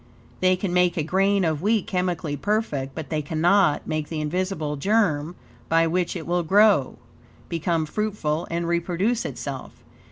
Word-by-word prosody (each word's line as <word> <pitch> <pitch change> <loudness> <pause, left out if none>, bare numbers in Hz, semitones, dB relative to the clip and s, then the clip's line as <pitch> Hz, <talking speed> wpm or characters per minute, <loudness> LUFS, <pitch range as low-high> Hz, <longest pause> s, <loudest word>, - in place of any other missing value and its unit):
They 185 0 +4
can 180 -1 -3
make 180 0 +3
a 155 - +1
grain 195 +3 +2
of 155 -2 -1
wheat 210 +1 +1
chemically 175 -5 -2
perfect, 145 -7 -2
but 160 -4 -6
they 155 -1 0
cannot 160 +3 +2
make 155 -1 -3
the 160 - -3
invisible 155 -1 -2
germ 170 -2 +1 0.3
by 165 0 +4
which 175 +2 -1
it 165 -3 -5
will 175 +1 +1
grow, 195 -4 +4 0.5
become 165 -1 0
fruitful, 175 -4 -2
and 170 0 -2
reproduce 180 +7 0
itself. - - -6
170 Hz, 155 wpm, -24 LUFS, 155-195 Hz, 0.5 s, They